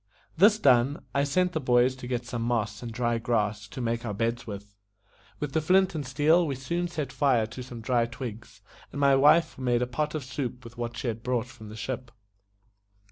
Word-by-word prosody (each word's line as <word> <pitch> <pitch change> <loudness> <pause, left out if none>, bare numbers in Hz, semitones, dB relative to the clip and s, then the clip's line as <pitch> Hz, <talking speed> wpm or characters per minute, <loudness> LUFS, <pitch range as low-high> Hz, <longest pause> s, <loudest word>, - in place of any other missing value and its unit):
This 205 +5 +6
done, 135 - +3
I 140 +1 +2
sent 180 +6 +1
the 160 - -1
boys 125 -1 +3
to 125 - -8
get 125 -1 -2
some 120 -1 -4
moss 115 -3 -1
and 120 -2 -6
dry 120 0 0
grass 105 -3 -1
to 115 - -9
make 115 0 -1
our 105 -4 -3
beds 115 +3 -1
with. 100 -1 -8 0.7
With 145 -2 -4
the 160 - +2
flint 185 +4 +3
and 155 -3 -3
steel 155 +6 +3
we 140 - -2
soon 170 +7 -2
set 155 -6 -4
fire 130 -7 +2
to 115 +4 -8
some 120 -2 -8
dry 120 0 +1
twigs, 115 -2 -8 0.3
and 145 - -6
my 140 -1 +5
wife 150 +4 +4
made 125 -1 +1
a - - +1
pot 150 +5 -2
of 155 - -3
soup 130 -1 -5
with 115 -2 -11
what 120 0 -5
she 125 - -3
had 115 -1 -3
brought 125 -1 -1
from 120 -4 -12
the 105 - -9
ship. 125 +3 -5
125 Hz, 215 wpm, -27 LUFS, 115-140 Hz, 0.7 s, This